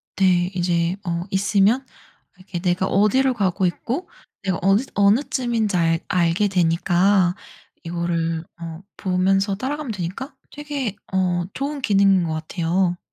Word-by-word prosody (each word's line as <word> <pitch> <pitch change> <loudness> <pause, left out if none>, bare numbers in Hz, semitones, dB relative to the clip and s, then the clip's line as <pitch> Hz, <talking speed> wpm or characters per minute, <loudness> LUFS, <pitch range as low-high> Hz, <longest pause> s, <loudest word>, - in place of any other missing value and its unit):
네. 180 -2 +3
이제 175 0 +1
어 170 -1 -2
있으면 200 +6 +2 0.5
이렇게 185 -1 -7
내가 180 +1 +1
어디로 215 +8 +3
가고 195 -3 0
있고 250 - -3 0.3
내가 185 -3 -1
어느 195 +4 +4
어느쯤인지 225 0 +2
알 165 -1 +2
알게 180 +2 +2
되니까 180 +1 +2 0.5
이거를 165 -1 -2 0.2
어 165 +1 -7
보면서 195 +1 +1
따라가면 265 +4 -3
되니까 205 - -5 0.2
되게 285 -8 -4 0.2
어 180 -2 +1
좋은 285 +1 -3
기능인 195 -5 +4
것 160 -1 -2
같아요. 175 +3 -1
190 Hz, 275 characters per minute, -22 LUFS, 175-210 Hz, 0.5 s, 어느